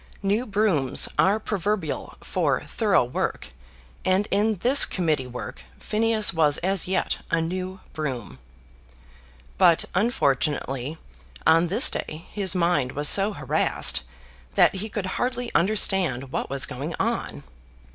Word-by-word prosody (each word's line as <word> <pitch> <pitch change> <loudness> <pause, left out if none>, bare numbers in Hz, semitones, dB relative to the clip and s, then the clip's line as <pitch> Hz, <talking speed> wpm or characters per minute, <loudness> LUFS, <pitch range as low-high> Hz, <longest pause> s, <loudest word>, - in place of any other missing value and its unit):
New 210 +6 0
brooms 195 -11 +2
are 200 +3 +3
proverbial 205 -6 -3
for - - -1
thorough - - +2
work, - - -3 0.5
and 185 +2 +1
in 210 +2 +2
this 255 +9 +5
Committee 155 -8 0
work 125 - -8
Phineas 220 0 +1
was 150 -3 +3
as 190 -1 0
yet 185 0 0
a 165 - +1
new 185 +3 -4
broom. 125 - -5 1.2
But, 175 -3 +5
unfortunately, 145 - 0 0.5
on 165 +2 +4
this 220 - +4
day 155 +2 -5
his 200 -2 -2
mind 170 -7 +1
was 145 +1 +2
so 200 +2 +4
harassed - - 0 0.5
that - - +5
he 200 +3 -4
could 205 -2 -4 0.2
hardly 245 -1 -2
understand 175 - +2
what - - -3
was 135 0 0
going 145 +5 -5
on. - - -2
185 Hz, 125 wpm, -24 LUFS, 150-205 Hz, 1.2 s, this